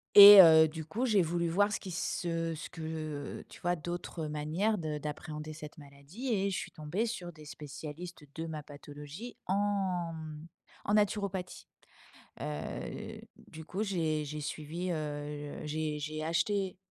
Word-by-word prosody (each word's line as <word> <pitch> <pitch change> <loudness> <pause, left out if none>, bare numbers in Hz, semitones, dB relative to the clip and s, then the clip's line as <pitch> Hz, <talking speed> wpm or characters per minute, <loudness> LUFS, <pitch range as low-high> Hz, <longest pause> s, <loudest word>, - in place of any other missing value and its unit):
et 205 0 +14
heu, 160 -2 +8
du 160 0 -6
coup, 230 +11 -1
j'ai 210 -6 +4
voulu 170 0 0
voir 205 +4 +3
ce - - -1
qui 185 - -7
ce 165 -1 -1
ce - - -7
que 155 -3 -5
tu - - -14
vois, 175 +1 +1
d'autres 175 0 -5
manières 155 +9 0
de 155 -2 -2
d'appréhender 150 +1 -6
cette 150 -1 -10
maladie 145 - -8
et 200 -1 +1
je 190 - -1
suis - - -5
tombée 165 +9 -2
sur 180 -7 -4
des 155 -2 -14
spécialistes 150 +4 -8
de 165 0 -4
ma 155 -2 -5
pathologie 145 +9 -9
en, 190 -4 0
mmh, 155 0 -8 0.4
en 205 - +1
naturopathie, 200 -3 0 0.7
heu, 75 -1 -5 0.2
du 160 0 -12
coup, 195 +5 -2
j'ai 160 -6 0
j'ai 150 +1 -5
suivi, 155 +5 -4
heu, 145 -2 -4
j'ai 150 0 -2
j'ai 155 +1 -4
acheté 190 +4 0
160 Hz, 155 wpm, -32 LUFS, 150-185 Hz, 0.7 s, et